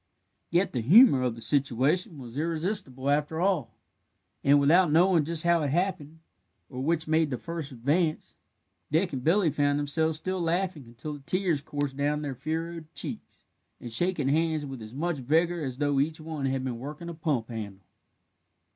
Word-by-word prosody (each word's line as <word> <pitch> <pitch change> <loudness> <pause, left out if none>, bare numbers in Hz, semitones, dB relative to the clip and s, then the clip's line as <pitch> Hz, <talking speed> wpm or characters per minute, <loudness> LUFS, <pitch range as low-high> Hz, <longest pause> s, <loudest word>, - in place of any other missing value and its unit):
Yet 175 +3 +1
the 125 - -1
humour 175 - +7
of 125 -2 -1
the 115 - -9
situation 145 - +1
was 120 -3 -10
irresistible 160 -4 -1
after 150 +2 0
all, 180 - 0 0.7
and, 140 +1 +5
without 160 +4 +4
knowing 170 -1 +4
just 165 0 -2
how 170 -1 +3
it 145 - 0
happened, 160 -1 -1 0.5
or 130 -1 -5
which 160 +2 0
made 160 -1 +2
the 125 - -2
first 165 -2 -6
advance, 150 +7 -1 0.6
Dick 165 +2 +1
and 130 -2 -4
Billy 170 +1 +3
found 145 0 +1
themselves 150 +2 0
still 185 +3 -3
laughing 170 -3 -1
until 120 +6 -7
the 145 - -8
tears 180 -6 0
coursed 145 -1 -4
down 150 +1 0
their 140 -2 -3
furrowed 160 +4 -5
cheeks, - - -5 0.4
and 120 - -8
shaking 170 0 0
hands 155 0 +1
with 135 -4 -7
as 110 +3 -10
much 170 +2 -1
vigour 165 +6 +1
as 130 -4 -4
though 145 -1 +1
each 155 +3 0
one 155 -3 -4
had 135 0 -1
been 125 -3 -4
working 150 +6 -7
a 170 - -5
pump 150 -8 -2
handle. 100 -5 -7
150 Hz, 175 wpm, -28 LUFS, 135-170 Hz, 0.7 s, humour